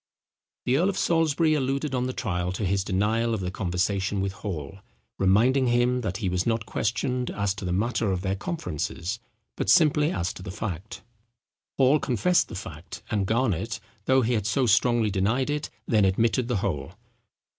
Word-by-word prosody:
The 125 Hz, +2 st, +3 dB
earl 180 Hz, +6 st, +3 dB
of 195 Hz, -, -3 dB
Salisbury 165 Hz, -1 st, +2 dB
alluded 140 Hz, 0 st, -1 dB
on 125 Hz, 0 st, 0 dB
the -, -, -2 dB
trial 90 Hz, -8 st, -2 dB
to 100 Hz, +2 st, -2 dB
his 95 Hz, +1 st, +1 dB
denial 110 Hz, +4 st, +1 dB
of -, -, -3 dB
the 90 Hz, -1 st, -3 dB
conversation 95 Hz, +1 st, -1 dB
with 95 Hz, 0 st, -1 dB
Hall, 95 Hz, -3 st, -6 dB, 0.4 s
reminding 120 Hz, +8 st, +4 dB
him 120 Hz, +1 st, +2 dB
that 95 Hz, -5 st, -3 dB
he 100 Hz, -, -2 dB
was 90 Hz, 0 st, 0 dB
not 115 Hz, -1 st, 0 dB
questioned 125 Hz, +4 st, -1 dB
as 100 Hz, -1 st, -1 dB
to 100 Hz, -1 st, -7 dB
the 90 Hz, -, -1 dB
matter 110 Hz, +2 st, 0 dB
of 90 Hz, -1 st, -1 dB
their 95 Hz, 0 st, 0 dB
conferences, 95 Hz, -, -4 dB, 0.4 s
but -, -, -2 dB
simply 155 Hz, -2 st, +5 dB
as 90 Hz, -, -2 dB
to -, -, -10 dB
the 95 Hz, -, -7 dB
fact. 95 Hz, -1 st, -5 dB, 0.7 s
Hall 135 Hz, +3 st, +5 dB
confessed 140 Hz, -, +2 dB
the 110 Hz, -, -8 dB
fact, 95 Hz, +1 st, -8 dB
and 100 Hz, -3 st, 0 dB
Garnet, 110 Hz, -6 st, 0 dB, 0.3 s
though 130 Hz, 0 st, +4 dB
he 120 Hz, +2 st, +1 dB
had 105 Hz, -3 st, 0 dB
so 130 Hz, +4 st, +2 dB
strongly 115 Hz, 0 st, +3 dB
denied 110 Hz, +9 st, +1 dB
it, 150 Hz, 0 st, -2 dB, 0.2 s
then 110 Hz, -3 st, +3 dB
admitted 115 Hz, +5 st, +2 dB
the 120 Hz, -3 st, 0 dB
whole. 80 Hz, -3 st, -3 dB
110 Hz, 180 wpm, -26 LUFS, 95-130 Hz, 0.7 s, simply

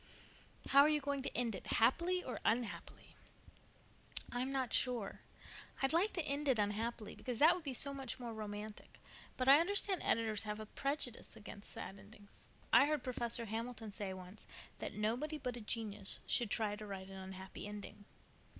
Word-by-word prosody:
"How 275 Hz, 0 st, +8 dB
are 295 Hz, -, +6 dB
you 305 Hz, -1 st, +3 dB
going 280 Hz, -1 st, -1 dB
to -, -, -3 dB
end 235 Hz, -2 st, +1 dB
it—happily 340 Hz, -, +2 dB
or 255 Hz, -, -4 dB
unhappily?" 230 Hz, -1 st, -2 dB, 1.2 s
"I'm 250 Hz, +2 st, -1 dB
not 260 Hz, -4 st, -1 dB
sure. 240 Hz, -6 st, +1 dB, 0.6 s
I'd 270 Hz, -, +3 dB
like 340 Hz, +4 st, +5 dB
it -, -, -15 dB
to 345 Hz, -, 0 dB
end 290 Hz, 0 st, 0 dB
unhappily, 220 Hz, -1 st, 0 dB
because 250 Hz, -3 st, -4 dB
that 315 Hz, +7 st, +8 dB
would 360 Hz, -2 st, -5 dB
be 275 Hz, -3 st, -3 dB
so 280 Hz, +4 st, +3 dB
much 265 Hz, -2 st, -5 dB
more 235 Hz, -2 st, -5 dB
romantic. 210 Hz, 0 st, -7 dB, 0.4 s
But 255 Hz, -, 0 dB
I 275 Hz, +2 st, +10 dB
understand 390 Hz, +1 st, +2 dB
editors 220 Hz, -2 st, +2 dB
have 210 Hz, 0 st, -4 dB
a 215 Hz, -, -5 dB
prejudice 275 Hz, +1 st, -3 dB
against 205 Hz, -1 st, -10 dB
sad 195 Hz, +1 st, -7 dB
endings. 205 Hz, +1 st, -15 dB, 0.3 s
I 280 Hz, -, +8 dB
heard 300 Hz, -3 st, 0 dB
Professor 235 Hz, -2 st, 0 dB
Hamilton 225 Hz, 0 st, -4 dB
say 200 Hz, -2 st, -4 dB
once 185 Hz, +2 st, -9 dB, 0.3 s
that -, -, -4 dB
nobody 240 Hz, +9 st, 0 dB
but 250 Hz, -4 st, -3 dB
a 240 Hz, -, -7 dB
genius 210 Hz, -2 st, -2 dB
should 235 Hz, -3 st, +1 dB
try 210 Hz, -1 st, +1 dB
to 215 Hz, 0 st, -7 dB
write 195 Hz, -1 st, -6 dB
an 195 Hz, -, -8 dB
unhappy 190 Hz, +1 st, -7 dB
ending. 205 Hz, 0 st, -8 dB
235 Hz, 175 wpm, -37 LUFS, 210-275 Hz, 1.2 s, I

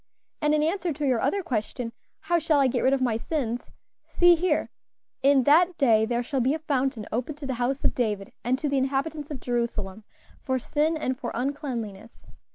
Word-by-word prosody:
"And 300 Hz, 0 st, +3 dB
in 300 Hz, -, +2 dB
answer 345 Hz, +2 st, 0 dB
to 295 Hz, +1 st, -3 dB
your 255 Hz, -4 st, +2 dB
other 400 Hz, -1 st, 0 dB
question, 230 Hz, -3 st, -3 dB, 0.3 s
'How 345 Hz, +1 st, +1 dB
shall 310 Hz, -2 st, +2 dB
I 275 Hz, -, +4 dB
get 250 Hz, -1 st, +1 dB
rid 260 Hz, -, +3 dB
of 270 Hz, -1 st, +1 dB
my 230 Hz, -3 st, +1 dB
sins?' 245 Hz, -3 st, -3 dB, 0.3 s
see 350 Hz, 0 st, +5 dB
here: 350 Hz, +2 st, 0 dB, 0.5 s
'In 275 Hz, -1 st, +5 dB
that 335 Hz, +6 st, +4 dB
day 225 Hz, -5 st, +4 dB
there 240 Hz, +1 st, -1 dB
shall 270 Hz, +2 st, -2 dB
be 260 Hz, +4 st, +2 dB
a -, -, -2 dB
fountain 270 Hz, -7 st, -1 dB
opened 255 Hz, +6 st, -3 dB
to 295 Hz, -, -7 dB
the 265 Hz, -, -2 dB
house 265 Hz, +3 st, 0 dB
of -, -, +3 dB
David 210 Hz, -5 st, -2 dB
and 250 Hz, +2 st, +1 dB
to 295 Hz, -, -2 dB
the 280 Hz, -1 st, +1 dB
inhabitants 280 Hz, +3 st, -2 dB
of 290 Hz, -4 st, -5 dB
Jerusalem 225 Hz, -5 st, -3 dB, 0.4 s
for 260 Hz, -2 st, -1 dB
sin 305 Hz, +5 st, 0 dB
and 260 Hz, -4 st, -2 dB
for 245 Hz, -5 st, -4 dB
uncleanliness.' 235 Hz, -6 st, -4 dB
265 Hz, 200 wpm, -26 LUFS, 240-300 Hz, 0.5 s, see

